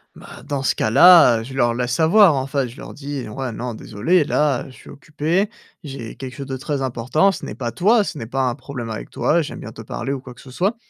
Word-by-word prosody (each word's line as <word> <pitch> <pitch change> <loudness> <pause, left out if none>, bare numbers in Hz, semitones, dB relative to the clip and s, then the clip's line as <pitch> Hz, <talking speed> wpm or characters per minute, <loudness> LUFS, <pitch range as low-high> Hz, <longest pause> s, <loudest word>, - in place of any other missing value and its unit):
Bah, - - -13
dans 140 -2 -3
ce 135 - +1
cas 110 - 0
là, 145 -5 +7
heu, - - -6
je 130 +3 -9
leur 120 -3 +2
laisse 125 +1 -2
savoir, 170 +2 +5
enfin 135 0 -1
je 120 +3 -13
leur - - -9
dis: 140 -2 -6
«Ouais. 130 +2 -4
Non 120 +1 -5
désolé, 115 - +1
là, 145 -3 0
je - - -13
suis - - -15
occupé, 155 +7 -1 0.3
j'ai 135 -6 -8
quelque 130 -2 -8
chose 140 - -6
de 135 -1 -5
très 140 +1 -3
important. 130 +9 +1
Ce - - -8
n'est 105 - -6
pas 120 -1 -4
toi 205 - +3
ce 155 - -6
n'est 115 - -6
pas 135 +3 -2
un 125 - 0
problème 130 -4 -7
avec 110 - -6
toi, 170 +3 +1
j'aime 155 - -6
bien 115 - -8
te 110 - -10
parler 120 +4 -4
ou 135 - -5
quoi 125 -2 -11
que - - -15
ce 130 - -13
soit 195 - 0
135 Hz, 260 wpm, -21 LUFS, 120-150 Hz, 0.3 s, là